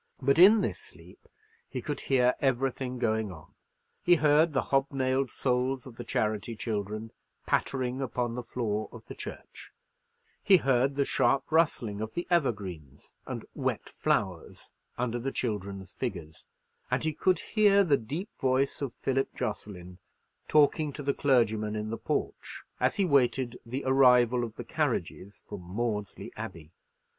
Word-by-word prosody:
But 140 +3 +2
in 205 +4 +8
this - - -2
sleep - - -16 0.4
he - - -4
could 145 -2 -4
hear 125 -2 +3
everything 130 -1 0
going 110 -3 0
on. 80 -4 -13 0.5
He 175 - +5
heard 155 +1 +4
the 135 - -1
hobnailed 135 -1 +1
soles 130 +1 -1
of 125 -3 -12
the 120 - -5
charity 110 0 -1
children 110 0 -4 0.3
pattering 130 -1 0
upon 120 -2 -2
the 125 - -4
floor 110 -3 -3
of - - -12
the - - -8
church; - - -10 0.7
he 195 - +6
heard 135 -2 +2
the 140 0 +1
sharp 135 0 +2
rustling 120 -10 +1
of 110 0 -5
the 175 - -2
evergreens 95 - -2
and - - -5
wet - - -2
flowers - - -1 0.3
under 120 -1 -1
the 135 +3 -3
children's 100 -6 -4
figures; 85 -11 -6 0.4
and - - 0
he 155 0 0
could 185 +4 +2
hear 205 -2 +4
the 155 -6 +4
deep 145 - -5
voice 130 +2 +1
of 135 -4 -3
Philip 135 0 +1
Jocelyn, 90 -3 -5 0.5
talking 150 0 +3
to 145 - -6
the 140 0 +1
clergyman 110 -6 +2
in 105 0 -3
the 115 - -3
porch, - - -4 0.2
as - - +2
he 200 - +2
waited 130 -4 +2
the 130 +4 -4
arrival 125 -2 +5
of 115 -2 -5
the - - -6
carriages 100 +3 -3
from 100 - -7
Maudesley 105 +2 -4
Abbey. 80 -1 -8
125 Hz, 150 wpm, -29 LUFS, 110-140 Hz, 0.7 s, in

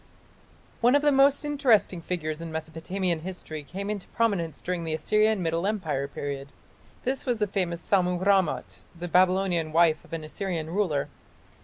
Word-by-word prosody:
One 245 +3 +5
of 290 - +3
the 295 - +5
most 280 +2 +4
interesting 240 - +2
figures 160 -2 -3
in 165 -1 -6
Mesopotamian 165 +3 -2
history 160 -3 -7
came 190 +8 -6
into 205 -3 -4
prominence 195 -9 0
during 180 -1 -3
the 160 -1 -1
Assyrian 215 +3 +2
Middle 165 +3 0
Empire 160 -10 -1
period. 140 -1 -5 0.6
This 265 +2 -2
was 245 -2 +1
the 210 - +1
famous 180 -4 -2
Sammu 180 -2 +2
rammat, 175 - +1 0.2
the 175 - -4
Babylonian 180 -2 +2
wife 160 -1 +3
of - - -19
an 165 -1 -3
Assyrian 165 0 -4
ruler. 170 -8 0
180 Hz, 160 wpm, -27 LUFS, 160-205 Hz, 0.6 s, One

